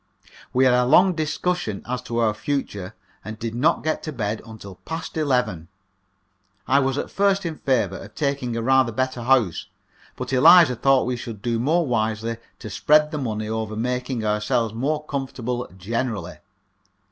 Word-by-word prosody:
We 130 Hz, +1 st, +3 dB
had 125 Hz, -, +5 dB
a 125 Hz, 0 st, +4 dB
long 180 Hz, +8 st, +5 dB
discussion 160 Hz, -, -2 dB
as 125 Hz, 0 st, -2 dB
to 120 Hz, -, -2 dB
our 115 Hz, -2 st, +2 dB
future, 105 Hz, -6 st, -4 dB, 0.3 s
and 110 Hz, 0 st, -7 dB
did 115 Hz, 0 st, -4 dB
not 150 Hz, +8 st, +1 dB
get 155 Hz, -, -1 dB
to 155 Hz, -, -5 dB
bed 110 Hz, -5 st, -3 dB
until 100 Hz, -4 st, -10 dB
past 160 Hz, 0 st, -6 dB
eleven. 125 Hz, -, 0 dB, 1.0 s
I 135 Hz, +2 st, +4 dB
was 135 Hz, 0 st, 0 dB
at -, -, -3 dB
first 200 Hz, -1 st, +1 dB
in 160 Hz, -2 st, -4 dB
favour 110 Hz, -8 st, 0 dB
of 105 Hz, +2 st, -12 dB
taking 140 Hz, -5 st, -1 dB
a 115 Hz, -, -2 dB
rather 130 Hz, -1 st, +3 dB
better 130 Hz, +1 st, -2 dB
house, 120 Hz, -8 st, +2 dB, 0.5 s
but -, -, -5 dB
Eliza 160 Hz, 0 st, +7 dB
thought 135 Hz, +2 st, +3 dB
we 125 Hz, -1 st, -2 dB
should 115 Hz, -3 st, -8 dB
do 115 Hz, -1 st, 0 dB
more 160 Hz, +7 st, +2 dB
wisely 110 Hz, -2 st, -1 dB, 0.2 s
to 110 Hz, -, -8 dB
spread 150 Hz, +9 st, +3 dB
the 150 Hz, -, -3 dB
money 110 Hz, -5 st, -3 dB
over 110 Hz, -1 st, -3 dB
making 125 Hz, 0 st, -2 dB
ourselves 110 Hz, +2 st, 0 dB
more 150 Hz, +6 st, -2 dB
comfortable 125 Hz, -4 st, -4 dB
generally. 105 Hz, -2 st, -3 dB
125 Hz, 170 wpm, -23 LUFS, 110-140 Hz, 1.0 s, Eliza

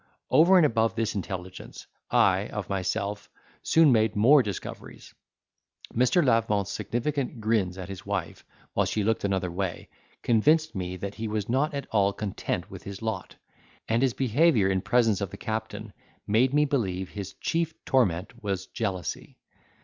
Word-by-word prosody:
Over 175 Hz, +5 st, +6 dB
and 170 Hz, -, +6 dB
above 115 Hz, -4 st, +1 dB
this 110 Hz, -1 st, -1 dB
intelligence, 95 Hz, -2 st, -6 dB, 0.2 s
I, -, -, +3 dB
of -, -, -6 dB
myself, 100 Hz, +2 st, -2 dB, 0.3 s
soon 160 Hz, -3 st, +5 dB
made 110 Hz, -2 st, +2 dB
more 130 Hz, +8 st, +6 dB
discoveries. 100 Hz, -6 st, -7 dB, 0.8 s
Mr. 125 Hz, +8 st, +3 dB
Lavement's 105 Hz, -5 st, +1 dB
significant 130 Hz, +1 st, -2 dB
grins 105 Hz, -5 st, 0 dB
at 90 Hz, -2 st, -6 dB
his 95 Hz, -2 st, -8 dB
wife, -, -, -4 dB, 0.3 s
while -, -, +1 dB
she 105 Hz, -, -1 dB
looked 110 Hz, +2 st, 0 dB
another 95 Hz, -3 st, -1 dB
way, 95 Hz, 0 st, -4 dB, 0.3 s
convinced 155 Hz, +7 st, +3 dB
me 90 Hz, -2 st, -4 dB
that 100 Hz, +2 st, -5 dB
he 110 Hz, +1 st, -5 dB
was 105 Hz, -1 st, -2 dB
not 140 Hz, +4 st, +1 dB
at 140 Hz, -, -3 dB
all 100 Hz, -2 st, +2 dB
content 100 Hz, -2 st, -4 dB
with -, -, -9 dB
his 100 Hz, +2 st, -8 dB
lot; 110 Hz, -5 st, -4 dB, 0.5 s
and 115 Hz, +2 st, +1 dB
his 130 Hz, -3 st, +1 dB
behaviour 130 Hz, -, +3 dB
in 95 Hz, -1 st, 0 dB
presence 115 Hz, -4 st, +2 dB
of 100 Hz, -, -2 dB
the -, -, -10 dB
captain 110 Hz, -1 st, -5 dB, 0.3 s
made 115 Hz, +5 st, +3 dB
me 150 Hz, +1 st, +3 dB
believe 95 Hz, -10 st, -1 dB
his 100 Hz, -2 st, -6 dB
chief 165 Hz, -1 st, -1 dB
torment 110 Hz, -, 0 dB
was 95 Hz, -2 st, -2 dB
jealousy. 95 Hz, -5 st, -4 dB
110 Hz, 155 wpm, -27 LUFS, 100-125 Hz, 0.8 s, Over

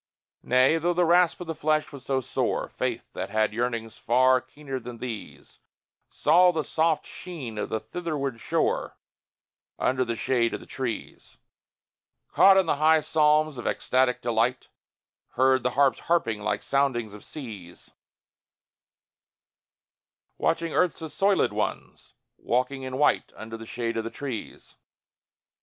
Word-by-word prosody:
Nay 130 Hz, +6 st, +3 dB
though 175 Hz, +2 st, 0 dB
the 175 Hz, 0 st, +3 dB
rasp 175 Hz, 0 st, +4 dB
of -, -, -5 dB
the 165 Hz, -, -3 dB
flesh 155 Hz, 0 st, 0 dB
was 140 Hz, -3 st, -10 dB
so 135 Hz, -1 st, 0 dB
sore, -, -, -1 dB
Faith, -, -, -4 dB
that 95 Hz, +1 st, -4 dB
had 110 Hz, 0 st, +1 dB
yearnings 115 Hz, -1 st, -3 dB
far 130 Hz, +2 st, +4 dB
keener 135 Hz, 0 st, -7 dB
than 120 Hz, 0 st, -9 dB
these, 115 Hz, -3 st, -8 dB, 0.5 s
Saw 180 Hz, +1 st, +4 dB
the 160 Hz, -3 st, -2 dB
soft 160 Hz, 0 st, +1 dB
sheen 135 Hz, -12 st, -7 dB
of -, -, -3 dB
the 110 Hz, -, -1 dB
Thitherward 140 Hz, -1 st, -4 dB
Shore -, -, -1 dB, 0.8 s
Under 130 Hz, 0 st, +1 dB
the 115 Hz, -1 st, -3 dB
shade 120 Hz, 0 st, +1 dB
of -, -, -6 dB
the -, -, -13 dB
trees; 125 Hz, -4 st, -6 dB, 1.0 s
Caught 190 Hz, -1 st, +6 dB
the 155 Hz, -, 0 dB
high 155 Hz, +1 st, +4 dB
psalms 150 Hz, -2 st, +2 dB
of -, -, -5 dB
ecstatic 130 Hz, -1 st, +1 dB
delight 120 Hz, +2 st, 0 dB, 0.6 s
Heard 130 Hz, +1 st, +3 dB
the 125 Hz, -, +1 dB
harps 140 Hz, -2 st, +4 dB
harping, 115 Hz, -11 st, 0 dB
like 105 Hz, 0 st, -2 dB
soundings 130 Hz, -6 st, 0 dB
of 105 Hz, -, -11 dB
seas 105 Hz, -, -10 dB, 2.5 s
Watched 165 Hz, -, +1 dB
earth's 165 Hz, +1 st, 0 dB
assoilèd 195 Hz, +5 st, +1 dB
ones -, -, -5 dB, 0.2 s
walking 130 Hz, +3 st, -1 dB
in 130 Hz, 0 st, -5 dB
white 145 Hz, -, +2 dB
Under 110 Hz, +1 st, -8 dB
the 115 Hz, 0 st, -9 dB
shade 115 Hz, 0 st, -3 dB
of 115 Hz, -, -1 dB
the 115 Hz, -, -4 dB
trees. 120 Hz, -1 st, -7 dB
130 Hz, 140 wpm, -26 LUFS, 115-155 Hz, 2.5 s, Caught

